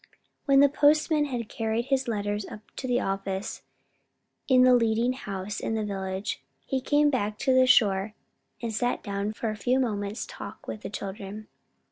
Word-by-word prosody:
When 275 -1 +6
the 285 - +8
postman 300 +1 +3
had 245 -5 -4
carried 225 +1 -2
his 265 -1 +1
letters 205 -2 -2
up 210 - -9 0.2
to 260 - -4
the 245 0 +2
office, 195 0 -3 0.9
in 255 -1 +6
the 255 0 +7
leading 230 +1 +2
house 200 -5 -5
in 225 - -2
the 215 -1 -1
village, 195 0 -3 0.2
he 265 -1 -1
came 290 +2 +3
back 210 -5 -1
to 260 - +2
the 255 0 +5
shore 210 -5 +3 0.5
and 230 -1 -2
sat 245 +3 -1
down 200 0 -2
for 220 0 -2
a - - -5
few 250 +5 +1
moments' 210 -3 -2
talk - - -9
with 210 - -5
the - - -5
children. 200 +1 -7
220 Hz, 175 wpm, -27 LUFS, 205-255 Hz, 0.9 s, the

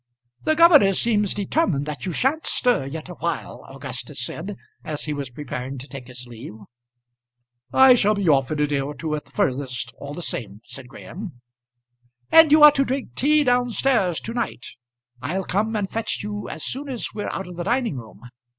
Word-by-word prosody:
"The 315 - +3
governor 305 - +7
seems 210 -1 +1
determined 200 - 0
that 150 +1 -5
you - - -1
sha'n't 275 - 0
stir 245 - +1
yet 155 +3 -6
awhile," - - -4
Augustus - - -6
said 195 +5 -5 0.3
as 150 -1 -4
he 150 - -2
was 140 -3 -4
preparing 130 0 -6
to 130 +2 -9
take 135 -4 -9
his 125 -1 -9
leave. 120 0 -10 1.2
"I 265 -1 +8
shall 215 -3 +3
be 200 -3 -1
off 135 -4 +3
in 155 - -2
a - - +4
day 145 -1 -1
or 140 +2 -4
two 155 +1 -4
at 150 - -3
the - - -23
furthest 125 -3 -1
all 145 +1 -7
the 175 - -5
same," 105 -7 -5
said 125 - -9
Graham. 165 - -9 0.9
"And 325 -2 +8
you 305 0 +7
are 300 - +11
to 275 -1 +2
drink 265 0 -3
tea 300 +2 +3
down 245 -1 +2
stairs 225 -9 +1
to 230 - -4
night. 235 - -3 0.6
I'll 180 +8 -2
come 215 +5 -1
and 205 -2 0
fetch 225 +1 -3
you 205 0 -5
as - - -6
soon 280 +2 -3
as 250 -4 -3
we're 210 - -4
out 195 - -4
of 180 0 -9
the 175 - -4
dining 240 - 0
room. 110 -4 -11
185 Hz, 195 wpm, -23 LUFS, -, 1.2 s, are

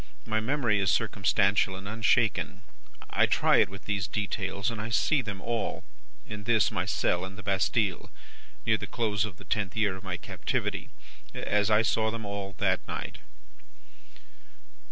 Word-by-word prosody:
My 110 0 0
memory 120 -3 +1
is 95 -1 +2
circumstantial 100 -2 +2
and 95 +1 -8
unshaken. 110 0 +1 0.5
I - - +4
try - - +4
it - - +4
with 100 +1 -11
these 100 -3 -1
details, 100 +2 -2
and 110 -2 -4
I 110 - -4
see 140 +5 +3
them 105 -5 -5
all, 115 +1 -2 0.4
in 105 -1 -7
this 110 -4 +3
my - - -1
cell 90 0 +1
in 95 +1 -6
the 105 - -10
Bastille, 100 +1 0 0.6
near 110 -1 +3
the - - -5
close 105 -4 0
of 100 -6 -8
the - - -13
tenth 100 -2 -1
year 105 -3 +2
of 95 - -11
my 90 -2 -3
captivity, - - -3 0.5
as 105 0 +1
I 105 +1 +5
saw 110 0 +2
them 110 -1 -5
all 100 -1 -5
that - - +2
night. - - -5
105 Hz, 165 wpm, -29 LUFS, 95-110 Hz, 0.6 s, I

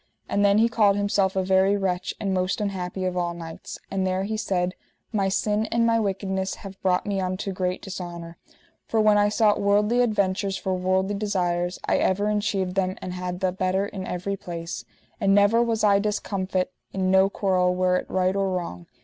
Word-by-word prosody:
And 200 - +1
then 200 0 +5
he 225 +2 +5
called 215 -4 +3
himself 200 -2 +1
a 190 - +1
very 190 +2 +3
wretch, 185 -2 -2
and 195 -2 -1
most 185 +2 0
unhappy 190 -2 -3
of 185 -1 -1
all 175 -1 -1
knights; 165 -1 -8
and 190 -1 0
there 185 +1 0
he 215 +2 -2
said: 185 -4 -1 0.4
My 195 -2 +1
sin 210 +2 0
and 230 0 +1
my 230 0 +3
wickedness 190 -2 -2
have 195 0 -9
brought 180 -1 +1
me 200 -2 -1
unto 185 +2 -2
great 185 -1 -2
dishonour. 175 -3 -7 0.5
For 225 - 0
when 215 -1 +5
I 205 0 +4
sought 210 -1 +2
worldly 210 +4 +3
adventures 200 -4 0
for 190 - -2
worldly 185 +2 0
desires, 180 -4 -1
I - - +2
ever 205 +3 +1
enchieved 200 -3 -1
them 185 -1 0
and 180 - -6
had 180 0 -5
the 185 -1 +2
better 185 +1 0
in 190 -2 -6
every 185 +3 -3
place, 170 -2 -6 0.3
and 195 0 +3
never 205 +3 +5
was 230 -2 0
I 200 -1 +5
discomfit 190 -3 -2 0.2
in 185 -1 0
no 190 +1 +5
quarrel, 185 -3 +1
were 180 0 +2
it - - -5
right 185 0 +1
or 195 -1 +1
wrong. 170 - -4
190 Hz, 195 wpm, -25 LUFS, 185-205 Hz, 0.5 s, then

